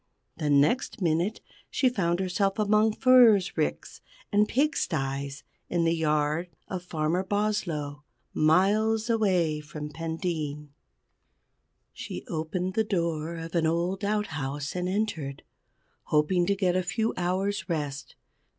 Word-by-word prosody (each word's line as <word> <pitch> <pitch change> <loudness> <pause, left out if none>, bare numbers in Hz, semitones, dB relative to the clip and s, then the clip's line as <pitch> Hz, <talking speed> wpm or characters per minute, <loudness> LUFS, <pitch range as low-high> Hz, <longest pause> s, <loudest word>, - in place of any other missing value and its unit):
The 150 - -1
next 145 - +2
minute 175 +4 0 0.3
she 265 - +2
found 175 -8 0
herself 195 +1 0
among 215 +1 +3
furze 225 -7 +5
ricks 75 0 -2 0.3
and 210 +1 +3
pigsties, 140 - -1 0.3
in 170 -1 +1
the 165 0 +3
yard 155 +1 0 0.2
of 185 -2 -4
Farmer 165 +1 -1
Boslow, 190 -8 -2 0.3
miles 215 +8 +3
away 180 -9 +2
from 150 0 -7
Pendeen. 160 -2 -4 1.2
She - - -7
opened 175 +4 -2
the 220 - +2
door 170 -5 -1
of 165 0 -7
an 165 -2 +2
old 175 +4 -1
outhouse, 150 -9 -2
and 180 0 -1
entered, 185 -9 -2 0.6
hoping 175 +4 +2
to 200 - +2
get 185 -3 +1
a 185 - +2
few 220 +5 -1
hours' 190 +2 -1
rest. 145 -3 -3
175 Hz, 125 wpm, -27 LUFS, 155-205 Hz, 1.2 s, furze